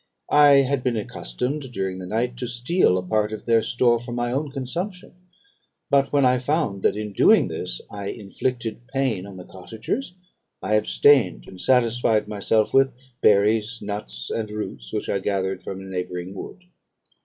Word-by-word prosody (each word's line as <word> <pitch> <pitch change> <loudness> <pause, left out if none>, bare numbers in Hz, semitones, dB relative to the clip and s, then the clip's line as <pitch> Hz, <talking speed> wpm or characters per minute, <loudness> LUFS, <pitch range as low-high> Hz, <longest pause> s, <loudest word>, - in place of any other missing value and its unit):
I 145 -2 +7
had 135 0 0
been 125 -3 0
accustomed, 125 - -4
during 95 -4 -3
the 90 - -7
night, 120 +4 -1
to 125 - -4
steal 120 - +2
a 90 - -2
part 105 +3 0
of 110 - -7
their 115 -1 +4
store 120 +1 +2
for 120 0 -7
my 120 0 -1
own 140 +3 -1
consumption; 170 +8 -5 0.8
but 140 -1 +3
when 140 -2 +3
I 125 0 +4
found 130 - -1
that - - +2
in 105 -1 -5
doing - - +5
this - - -5
I 100 -1 -6
inflicted 115 +3 -4
pain 130 -8 -1
on 100 -2 -10
the 90 - -8
cottagers, 115 - -5 0.4
I 105 - -2
abstained, 105 - +4
and 90 -1 -11
satisfied 120 -4 +2
myself 105 +1 +1
with 135 -1 +4 0.3
berries, 105 +3 +3
nuts, 60 -13 -6
and 110 -2 -2
roots, 105 - -6
which - - -3
I 100 - 0
gathered 95 -1 -2
from 95 - -6
a - - -9
neighbouring 90 -1 -5
wood. 180 - -9
115 Hz, 170 wpm, -23 LUFS, 100-130 Hz, 0.8 s, I